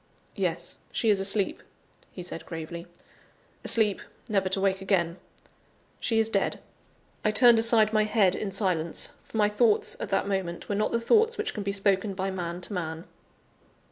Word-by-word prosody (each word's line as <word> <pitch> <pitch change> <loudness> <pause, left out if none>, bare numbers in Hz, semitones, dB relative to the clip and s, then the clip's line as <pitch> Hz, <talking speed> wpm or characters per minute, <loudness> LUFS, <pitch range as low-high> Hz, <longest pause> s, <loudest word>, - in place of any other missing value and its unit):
"Yes, - - -3
she 225 - +2
is 200 - +2
asleep," 195 0 0 0.5
he 180 - -8
said 165 -2 -8
gravely; 170 +1 -7 0.8
"asleep, 215 -3 +2 0.3
never 195 -4 +1
to 190 - 0
wake 190 0 +1
again. 180 -3 0 0.8
She 225 - 0
is 225 0 +3
dead." 200 -3 0 0.6
I 215 - +3
turned 230 +2 +6
aside 225 -1 +4
my 215 -1 +3
head 210 -4 +3
in 200 - -3
silence, 180 -5 0
for - - -8
my 210 -1 +4
thoughts, 210 +1 +2
at - - -4
that 195 0 0
moment, 190 -3 -3
were - - -2
not 210 +1 0
the 235 - +1
thoughts 445 - +3
which 425 - -2
can 210 - -4
be 200 0 -2
spoken 200 0 +1
by 190 0 -2
man 175 -1 -4
to 190 - -6
man. 160 -3 -4
195 Hz, 175 wpm, -27 LUFS, 185-215 Hz, 0.8 s, turned